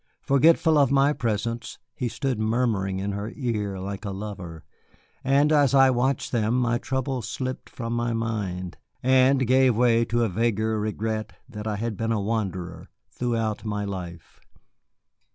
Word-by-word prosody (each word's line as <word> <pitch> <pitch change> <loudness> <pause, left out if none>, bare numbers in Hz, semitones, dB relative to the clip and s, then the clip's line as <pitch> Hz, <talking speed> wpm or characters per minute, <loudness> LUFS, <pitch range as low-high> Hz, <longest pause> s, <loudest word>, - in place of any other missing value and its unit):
Forgetful 155 +2 +4
of 140 -3 +4
my 140 +1 +4
presence, 115 -1 -3 0.2
he 125 - -3
stood 130 0 -2
murmuring 110 -4 0
in 100 +1 -2
her 100 +2 -4
ear 105 -7 -2
like 100 +2 -5
a 100 - -4
lover; 95 -5 -7 0.6
and 140 +3 +3
as 145 -3 +4
I 135 -1 +6
watched 130 +2 0
them 115 -1 +1
my 120 -1 +1
trouble 130 -1 -2
slipped 130 +3 -5
from 115 -1 -5
my 120 0 0
mind, 105 -6 -3 0.3
and 130 +1 +4
gave 130 0 +4
place 115 -1 +3
to 120 0 +2
a - - +2
vaguer 110 +1 0
regret 110 0 -3
that 110 -4 -7
I 105 - -1
had 110 0 -3
been 115 +2 -1
a 110 - +1
wanderer 100 -4 -3 0.2
throughout 115 -3 -2
my 105 -1 -2
life. 90 -4 -7
115 Hz, 155 wpm, -25 LUFS, 105-130 Hz, 0.6 s, I